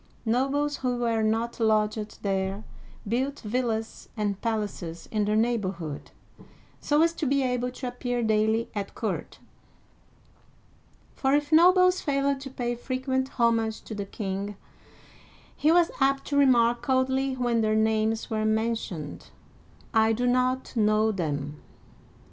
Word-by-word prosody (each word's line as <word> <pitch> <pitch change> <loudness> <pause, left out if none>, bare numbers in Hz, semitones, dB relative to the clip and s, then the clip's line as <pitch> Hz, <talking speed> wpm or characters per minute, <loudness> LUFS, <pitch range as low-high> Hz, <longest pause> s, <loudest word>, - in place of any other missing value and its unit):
Nobles 275 +5 +1
who 250 -1 -1
were 230 -2 0
not 225 +2 0
lodged 215 -1 0
there 195 +1 -1 0.4
built 260 +6 -1
villas 225 0 -3
and 205 -2 -2
palaces 205 -7 -3
in 215 -2 +1
the 210 +1 +1
neighborhood, 195 -10 -1 0.7
so 300 +2 +2
as 335 0 +2
to 315 -3 -2
be 275 +1 +2
able 250 -1 0
to 255 +1 -8
ap 245 0 -6
pear 245 -1 -1
daily 220 +1 +2
at 200 -2 -5
court; - - -4 1.8
for 270 +1 +1
if 295 +1 -1
nobles 365 +3 +6
failed 275 -1 0
to 270 0 -7
pay 245 -2 -2
frequent 260 +2 -2
homage 230 -2 +2
to - - -8
the 205 -1 -4
king, 200 0 -4 1.0
he 305 - +3
was 345 0 +4
apt 275 0 +2
to 285 - -3
remark 240 -4 +4
coldly 265 0 +1
when 240 -2 +1
their 215 0 +1
names 220 0 +1
were 220 -2 -1
mentioned, 215 -8 -2 0.4
" - - -28 0.2
I - - +3
do 245 +3 -1
not 255 +1 +1
know 215 0 +3
them.' 150 -6 -3
235 Hz, 140 wpm, -27 LUFS, 215-260 Hz, 1.8 s, nobles